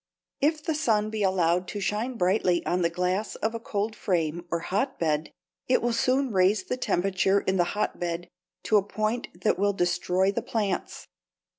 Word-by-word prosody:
= - - -51
If 305 -2 -14
the 320 - 0
sun 220 -8 +1
be 220 -1 -3
allowed 180 -2 +2
to 205 - -5
shine 215 +5 -1
brightly 180 -2 +2
on 180 +1 0
the 170 - +2
glass 180 +4 -1
of 220 +2 -2
a 230 - -4
cold 215 0 -2
frame 170 -2 -1
or 170 - 0
hotbed, 170 - -1 0.4
it 250 - +4
will 240 0 0
soon 255 +2 +1
raise 190 +1 +3
the 250 - -2
temperature 195 -3 +1
in 190 0 0
the 175 - +4
hotbed 175 -4 -2 0.4
to 215 - +4
a - - +4
point 215 +3 -2
that - - +1
will 200 0 +2
destroy 180 +1 +1
the 235 - -2
plants. 215 -5 -3
195 Hz, 180 wpm, -27 LUFS, 180-220 Hz, 0.4 s, it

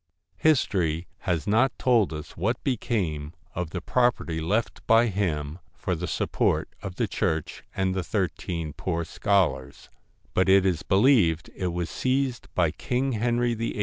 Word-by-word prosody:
History 90 - +2 0.2
has 85 -1 0
not 115 +5 +2
told 120 -8 +3
us 75 -1 -7
what 110 +8 -1
became 90 - -1 0.2
of 90 -2 -3
the 90 +1 -5
pro 120 +8 +3
perty 80 -7 -5
left 105 +8 -1
by 115 +1 +6
him 85 -7 -2 0.2
for - - -2
the - - -3
support - - 0
of 95 -3 -6
the - - 0
church 80 -1 -2
and 95 -1 +1
the 95 -1 -1
thirteen 85 -4 -2
poor 85 0 -2
scholars; 80 -9 0 0.4
but 95 +1 +2
it 95 0 +6
is 90 -4 +1
believed 95 - +3
it 90 - -2
was 85 -1 -3
seized 130 -2 -1
by 85 -4 +3
King 130 - -1
Henry 120 +1 +1
VIII. 115 -1 -3
95 Hz, 155 wpm, -26 LUFS, 80-115 Hz, 0.4 s, by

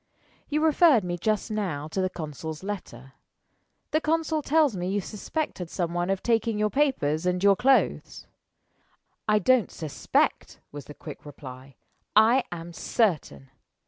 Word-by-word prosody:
"You 300 +1 0
referred 310 - +5
me 175 -1 -2
just 215 +4 -1
now 180 -9 -2
to 190 - -2
the 185 - 0
consul's 155 -1 -7
letter. 135 - -7 0.8
The 310 +1 +2
consul 320 0 0
tells 295 -5 +2
me 180 0 -3
you 200 +1 0
suspected 205 - -4
some 170 -2 -2
one 175 +1 -1
of 195 -1 -1
taking 230 -2 +1
your 210 0 +1
papers 180 - +1
and 180 +1 0
your 200 -1 +6
clothes." 265 +6 +1 1.0
"I 215 0 +4
don't 240 +2 +3
suspect," 155 -4 -1
was 145 -1 -8
the 150 - -11
quick 150 - -10
reply; 130 -2 -11 0.4
"I 230 +4 +5
am 170 0 -7
certain! 150 - -1
190 Hz, 145 wpm, -26 LUFS, 160-240 Hz, 1.0 s, your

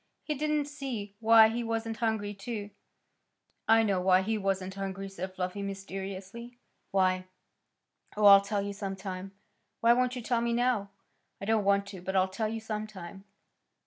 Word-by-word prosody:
He 305 - -2
didn't 300 0 0
see 260 -9 -6
why 225 -1 +7
he 235 +2 -2
wasn't 225 -1 -2
hungry, 220 -3 -1
too. 205 0 -6 1.0
"I 225 0 +6
know 195 -4 +1
why 185 0 +4
he 220 +3 0
wasn't 195 -2 -1
hungry," 195 0 -5
said 190 -1 -6
Fluffy 185 +2 -3
mysteriously. 195 +4 -6 0.3
"Why?" 185 -1 +1 0.9
"Oh, 210 - +3
I'll 200 -1 +10
tell 200 0 -2
you 200 0 -4
some 195 -1 -4
time." 190 0 -6 0.5
"Why 235 +1 +5
won't 250 +1 +1
you 250 - -5
tell 235 0 +1
me 235 0 0
now?" 240 -4 +1 0.5
"I - - -6
don't 220 -1 +2
want 200 0 +3
to; 190 -3 -9
but 190 +2 -4
I'll 190 0 +4
tell 215 +3 -2
you 225 +1 -3
some 215 -1 -4
time." 195 -1 -10
205 Hz, 175 wpm, -30 LUFS, 195-225 Hz, 1.0 s, I'll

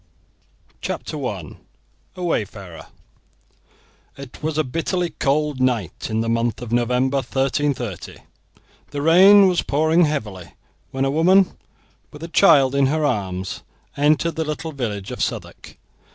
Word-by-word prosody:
CHAPTER - - -5
I: - - -7 0.6
A 180 - -6
WAYFARER 100 - -4 1.3
It 140 -2 -11
was 155 0 -2
a 155 - +2
bitterly 165 +5 -2
cold 145 0 0
night 120 -9 -1
in 110 0 -1
the 115 - -2
month 115 0 0
of 120 -2 -8
November, 125 +3 +1
1330. 135 - -2 0.7
The 145 - -4
rain 190 +5 +7
was 180 -2 +1
pouring 160 +4 +2
heavily, 105 - -5 0.4
when 135 0 -2
a 135 - 0
woman, 180 +5 +3 0.5
with 165 +3 -10
child 140 -9 +5
in 140 -1 +3
her 155 +2 0
arms, 95 -7 -3 0.3
entered 155 +3 +1
the 160 - 0
little 155 +1 -5
village 105 -9 -5
of - - -6
Southwark. - - -5
140 Hz, 130 wpm, -21 LUFS, 120-160 Hz, 1.3 s, rain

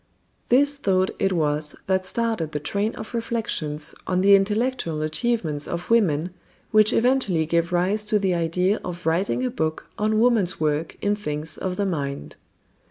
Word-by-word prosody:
This 285 +3 +4
thought 190 -7 +1
it 195 - +1
was 150 -3 0
that 190 -1 0
started 220 -7 -2
the 150 - -1
train 200 +9 -2
of 220 - -8
reflections 215 -11 -2
on 185 0 +1
the 200 +1 +6
intellectual 210 -5 0
achievements 160 -3 -1
of 175 +5 -5
women 180 -7 +2 0.4
which 215 0 +5
eventually 230 -11 +2
gave 170 +2 0
rise 185 +4 +1
to 210 0 +2
the 195 -3 +1
idea 180 +4 0
of 180 0 -7
writing 185 +10 +1
a 250 - -1
book 160 -8 -3
on 215 +1 +1
woman's 225 -6 +2
work 155 +1 -1
in 205 0 +2
things 155 -6 -3
of 185 -1 -3
the 200 - -1
mind. 140 - -4
185 Hz, 165 wpm, -24 LUFS, 160-215 Hz, 0.4 s, the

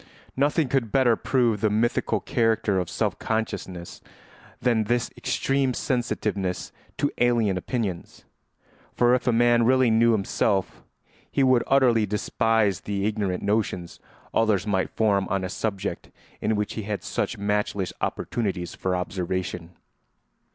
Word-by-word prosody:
Nothing 145 +2 +2
could 125 -5 0
better 130 -4 +4
prove 115 -4 +1
the 110 - +3
mythical 110 +3 +1
character 110 -3 +1
of 90 - -3
self - - -1
consciousness 95 -6 -4 0.6
than 115 -3 +2
this 120 +1 0
extreme 135 -2 0
sensitiveness 105 -7 -2 0.3
to 145 - 0
alien 120 -5 +3
opinions; 95 -2 -4 0.7
for 120 0 +4
if 125 0 0
a - - +5
man 120 0 +4
really 130 0 +4
knew 115 +1 +4
himself 100 -1 0 0.5
he 140 - +2
would 130 -2 +4
utterly 120 -5 +4
despise 105 0 +1
the 100 -1 -2
ignorant 105 -4 -1
notions 100 -5 -1 0.3
others 110 -3 +2
might 95 -3 0
form 100 -3 +1
on 95 0 0
a 95 - -3
subject 100 0 -3 0.3
in 110 - +1
which 105 0 -2
he 110 - -4
had 105 0 -4
such - - -2
matchless 100 -2 -1
opportunities 95 -7 -2
for 95 -1 -2
observation. 90 -2 -3
110 Hz, 135 wpm, -25 LUFS, 95-120 Hz, 0.7 s, a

